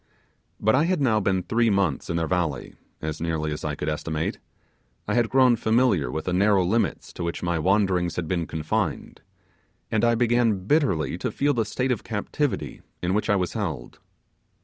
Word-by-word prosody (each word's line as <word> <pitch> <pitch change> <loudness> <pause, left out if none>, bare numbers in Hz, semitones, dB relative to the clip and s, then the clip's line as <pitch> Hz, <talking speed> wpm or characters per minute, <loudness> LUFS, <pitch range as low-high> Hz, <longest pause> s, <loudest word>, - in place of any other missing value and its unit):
But 110 +1 +3
I 145 +5 +4
had 180 -1 +1
now 120 -6 +3
been 95 -2 0
three 115 +3 +2
months 95 -8 0
in 85 - 0
their 85 - 0
valley, 85 -3 -2 0.3
as 80 0 -4
nearly 80 -2 -1
as 75 - -5
I 75 -1 -2
could 75 - -5
estimate; 80 +1 -2 0.7
I - - 0
had 120 -2 +2
grown 130 -2 +5
familiar 110 - +2
with 80 +5 -4
the 90 - -1
narrow 100 0 +3
limits 110 +6 -1
to 90 - -5
which 85 0 -3
my 85 -2 0
wandering 95 -1 +2
had 85 -2 -3
been 85 -1 -1
confined; 80 0 -3 0.7
and 110 - +1
I 115 0 +4
began 115 -5 +2
bitterly 100 - +1
to - - -1
feel 145 +1 +1
the 115 -4 0
state 125 +5 -1
of 120 - -2
captivity 120 +6 -3 0.2
in 90 +1 +1
which 105 +2 0
I 105 - +4
was 90 -2 -1
held. 85 - -4
95 Hz, 190 wpm, -25 LUFS, 85-115 Hz, 0.7 s, grown